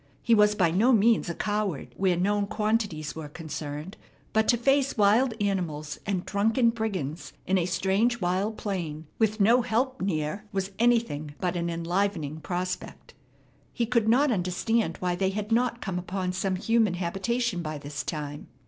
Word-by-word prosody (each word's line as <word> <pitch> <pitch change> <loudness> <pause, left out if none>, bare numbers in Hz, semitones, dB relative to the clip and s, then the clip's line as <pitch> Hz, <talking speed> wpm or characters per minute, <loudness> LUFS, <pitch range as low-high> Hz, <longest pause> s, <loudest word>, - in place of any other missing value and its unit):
He 235 - +3
was 210 -1 +5
by 180 -6 +3
no 215 +9 +4
means 225 -4 +4
a 170 - -3
coward 205 -7 -2
where 185 -2 +1
known 200 +3 +1
quantities 210 -8 -1
were 155 -2 -6
concerned, 150 +3 -6 0.4
but 220 0 +3
to 240 - +4
face 275 +2 +2
wild 220 +4 +4
animals 170 -7 -2
and 190 -3 -1
drunken 225 +4 +2
brigands 190 -9 -4
in 190 0 +2
a 170 - 0
strange, 195 +7 +1
wild 190 +4 0
plain 165 -6 -4
with 220 -1 +2
no 230 +5 +5
help 245 +3 -1
near 165 0 -1
was 195 -1 -2
anything 225 -12 +1
but 180 -1 -1
an 170 0 -1
enlivening 170 -2 -1
prospect. 180 +2 -4 0.6
He 235 - 0
could 230 -2 +2
not 270 +4 +4
understand 185 +1 0
why 180 -1 -1
they 190 +2 +1
had 210 +2 -4
not 240 +1 +1
come 185 -3 -2
upon 180 0 -3
some 190 0 -1
human 220 0 +2
habitation 195 +3 -1
by 155 -2 -4
this 145 0 -5
time. 145 -2 -5
195 Hz, 165 wpm, -27 LUFS, 170-225 Hz, 0.6 s, was